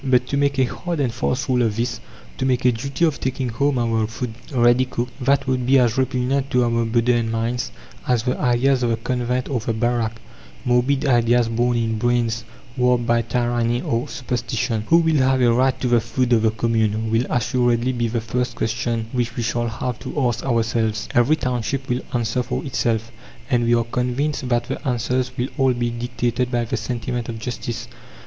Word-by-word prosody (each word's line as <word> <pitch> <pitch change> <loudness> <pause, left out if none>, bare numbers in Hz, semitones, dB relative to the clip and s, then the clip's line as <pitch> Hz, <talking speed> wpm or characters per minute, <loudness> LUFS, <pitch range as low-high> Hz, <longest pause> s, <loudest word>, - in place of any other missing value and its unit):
But 125 -2 +3
to - - -1
make 140 -1 +1
a 130 - +4
hard 170 +6 -3
and 130 -5 0
fast 125 +3 -1
rule 125 -1 +2
of 110 -3 +1
this, 120 - -2 0.4
to - - 0
make 125 -1 +1
a 125 - +6
duty 140 +8 -1
of 155 -3 0
taking 130 -1 -2
home 135 +4 +1
our 115 -2 +1
food 115 +1 -5 0.2
ready 120 0 +4
cooked, 125 -1 -3
that 140 +2 +3
would 130 -1 0
be 135 +1 +6
as 120 -4 +3
repugnant 130 +1 0
to 125 0 +3
our 120 - +1
modern 115 0 +1
minds 115 +2 -1 0.4
as 120 -3 +2
the 125 0 0
ideas 125 +2 +2
of 120 - +1
the 115 - +1
convent 125 +1 -1
or 130 -4 -1
the 115 +1 -2
barrack 115 0 -1 0.5
morbid 125 +4 +2
ideas 120 -2 +3
born 120 +1 +1
in 110 -1 -1
brains 120 -1 0 0.3
warped 125 -1 +2
by 120 0 +3
tyranny 120 0 0
or 115 +1 -1
superstition. 120 -3 -2
Who 165 - +6
will 160 -2 +3
have 130 0 +3
a 120 -2 +4
right 130 +2 +2
to 125 - +1
the 120 -1 +3
food 125 +2 0
of 115 - +4
the 110 - +3
commune? 110 -1 0
will 115 +2 +1
assuredly 120 0 +1
be 120 -2 -1
the 115 0 -2
first 125 +3 -2
question 115 +1 -1
which 120 -1 -1
we 120 - -2
shall 120 +1 -1
have 115 +1 -4
to - - -4
ask 120 - -2
ourselves. 115 -3 0
Every 120 +6 +4
township 125 -1 -2
will 125 0 -1
answer 120 0 0
for - - -3
itself, 115 -4 -1 0.4
and 120 -2 +3
we 120 0 +4
are 115 - +2
convinced 125 +3 -2
that 120 -1 +2
the - - -5
answers 125 +1 0
will 125 +2 -1
all 135 -1 +4
be 120 -1 -1
dictated 120 +1 -2
by 120 -2 0
the - - -2
sentiment 120 -1 -3
of 115 - -4
justice. 120 0 -5
120 Hz, 200 wpm, -22 LUFS, 115-125 Hz, 0.5 s, a